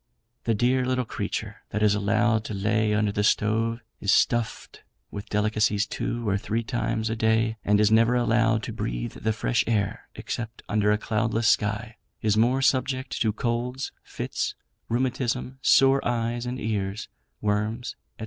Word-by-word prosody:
The 115 - +2
dear 125 +4 +2
little 130 0 0
creature - - -4
that 105 +1 -1
is 105 -1 +5
allowed 110 +2 +2
to 105 - -4
lay 110 +2 +1
under 105 -1 +1
the 105 +1 -1
stove, 115 +3 +1 0.2
is 100 - +1
stuffed 120 -2 +1 0.3
with 100 +1 -7
delicacies 105 0 +1
two 120 +2 -3
or 100 -1 +1
three 115 +3 -2
times 110 -1 -1
a - - -1
day, 110 0 +1
and 105 0 +3
is 105 0 +4
never 115 +2 +4
allowed 115 -2 +2
to - - -5
breathe - - -3
the 110 - -1
fresh 115 +1 0
air, 105 -4 -1
except 115 -1 -5
under 105 0 +2
a 105 - +3
cloudless 110 +1 0
sky, 110 +2 0 0.2
is 105 -1 +1
more 125 +5 +3
subject 130 0 0
to 110 - +3
colds, 120 +3 -2
fits, - - -3 0.3
rheumatism, 125 +1 -1
sore 135 +1 +5
eyes 120 0 -1
and 125 +1 -4
ears, 100 -2 -2 0.3
worms, 105 +3 -1 0.2
&c. - - -40
110 Hz, 160 wpm, -26 LUFS, 105-120 Hz, 0.3 s, is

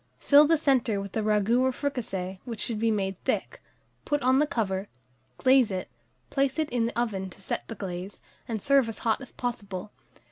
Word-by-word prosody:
Fill 290 +1 +6
the 325 +1 +4
centre 255 -8 +2
with 200 -1 -6
the 220 - -1
ragoût 215 +2 +2
or 260 0 +3
fricassee, 195 -10 -3
which 230 -4 -6
should 220 -1 -2
be 225 +1 +2
made 195 -3 -1
thick; - - -2 0.4
put 290 -1 0
on 260 +1 +4
the 300 - +3
cover, 195 -6 -1 0.5
glaze 260 -3 +5
it, 185 -2 -4 0.4
place 275 0 +1
it 310 -1 -1
in 235 -2 +1
the 235 - -3
oven 195 -5 -1
to 180 - -15
set 195 - -4
the 225 - -6
glaze, 185 0 -6 0.3
and 220 -3 -3
serve 275 -4 +4
as 225 - -6
hot 225 +3 +2
as 265 - -9
possible. 205 -5 -5
225 Hz, 200 wpm, -27 LUFS, 195-260 Hz, 0.5 s, Fill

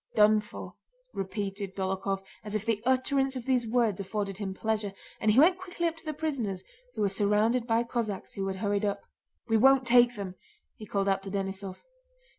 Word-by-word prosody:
"Done 215 0 +6
for!" 210 - -9 0.4
repeated 195 0 -4
Dólokhov 190 0 -1 0.2
as 210 0 -5
if 215 0 -1
the 225 -3 0
utterance 270 +1 +2
of 250 -2 -5
these 250 -3 +2
words 225 -4 +2
afforded 195 0 -3
him 200 -2 -3
pleasure, 215 -1 -1 0.3
and 220 - +2
he 215 +5 +5
went 355 +5 +6
quickly 355 -2 -4
up 330 -1 +1
to 325 - -15
the 310 - -1
prisoners, 275 -12 -2 0.3
who - - -2
were 205 - +4
surrounded 210 +5 +2
by 230 0 +3
Cossacks 230 -5 -3
who 195 -1 -3
had 190 - -2
hurried 205 +1 0
up. 200 -1 -1 0.4
"We 225 -1 +3
won't 265 +3 +5
take 245 0 +5
them!" 195 -3 -5 0.4
he 215 - -9
called 200 0 0
out 195 -1 +2
to 195 - -7
Denísov. 195 -1 -4
210 Hz, 195 wpm, -29 LUFS, 195-245 Hz, 0.4 s, Done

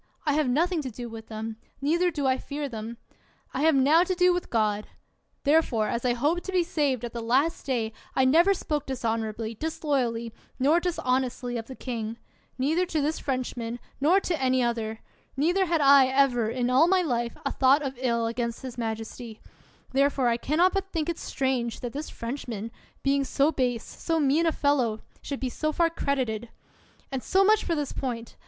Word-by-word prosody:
I 295 - +2
have 300 -3 +2
nothing 330 +6 +1
to 265 - -4
do 240 +1 -7
with 225 0 -9
them, 220 0 -5 0.2
neither 335 +6 +2
do 295 -5 -3
I 260 0 +2
fear 290 0 -4
them. 230 -1 -6 0.6
I 265 - -2
have 320 -1 +4
now 290 +6 +5
to 370 0 -1
do 360 0 +4
with 355 - -3
God; 210 -2 0 0.6
therefore, 280 -8 +2
as 235 - -2
I 245 - +3
hope 300 +8 +1
to 385 - -6
be 365 -2 +3
saved 280 -7 0
at 235 - -7
the 235 - -4
last 265 +10 +1
day, 230 -4 -1 0.2
I 265 - +4
never 340 +9 +5
spoke 300 -5 -3
dishonorably, 225 -3 -2
disloyally, 245 -5 -2 0.2
nor 290 +6 +4
dishonestly 255 -7 -1
of 230 -1 -4
the 260 - -8
king, 230 -3 -4 0.4
neither 320 +8 +1
to 320 -3 -1
this 300 +2 0
French 255 -2 -2
man, 235 0 -4 0.2
nor 330 +8 +4
to 335 -7 -2
any 260 -1 +2
other; 225 -2 -2 0.4
neither 355 +6 +2
had 330 -2 +1
I 275 -1 +7
ever, 260 -4 +2
in 245 +1 -1
all 275 +6 +5
my 370 0 +3
life, 240 -6 -1
a - - 0
thought 275 +3 +4
of 270 -2 -2
ill 235 -3 +1
against 235 +1 -3
his 250 -2 -7
majesty; 225 0 -5 0.5
therefore 275 -2 +2
I 230 - +1
can 290 +6 -2
not 360 +2 +4
but 390 -1 -2
think 320 -1 -1
it 340 - -3
strange 255 -4 -2
that 245 -2 -5
this 295 +2 -5
Frenchman, 230 -3 -5 0.3
being 275 0 +2
so 275 +3 +2
base, 245 -5 0
so 325 -1 -2
mean 300 +3 +3
a - - +4
fellow, 255 -8 +1 0.2
should 280 - -5
be 260 - -2
so 310 +5 -1
far 335 +1 +2
credited; 245 -8 -2 0.6
and 265 -1 -2
so 385 +8 +3
much 430 +2 +4
for 335 - 0
this 295 -3 -2
point. 235 -4 -4
265 Hz, 195 wpm, -27 LUFS, 235-310 Hz, 0.6 s, I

